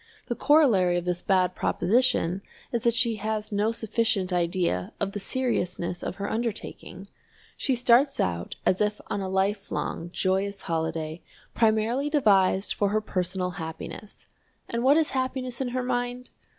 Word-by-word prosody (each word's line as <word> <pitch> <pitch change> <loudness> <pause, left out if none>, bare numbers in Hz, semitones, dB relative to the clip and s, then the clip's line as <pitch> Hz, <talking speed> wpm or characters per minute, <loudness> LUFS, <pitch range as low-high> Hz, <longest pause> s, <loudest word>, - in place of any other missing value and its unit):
The - - 0
corollary 220 - +4
of 175 - -3
this 180 0 -1
bad 185 -2 +2
proposition 200 -5 +1 0.3
is 235 -1 -1
that 235 -1 +3
she 235 -2 +2
has 215 +1 -3
no 210 +2 +1
sufficient 220 -4 0
idea 170 - 0
of 200 -1 -1
the 205 - -4
seriousness 180 -7 -2
of - - -4
her 200 0 -4
undertaking. 220 -4 -4 0.5
She 265 - 0
starts 250 +3 +4
out 85 -1 -1
as 185 - +2
if 210 0 0
on 200 - -1
a 190 - -3
lifelong 195 -3 -1
joyous 195 +2 -1
holiday, 160 0 -2 0.3
primarily 225 +5 +2
devised 200 -9 +3
for 205 - +1
her 215 +2 +2
personal 185 -2 -1
happiness. 160 +5 -8 0.4
And 235 0 -2
what 280 +4 +6
is 320 -2 +2
happiness 260 -1 -2
in 265 - 0
her 250 +1 -2
mind? 245 0 -2
205 Hz, 150 wpm, -26 LUFS, 185-245 Hz, 0.5 s, what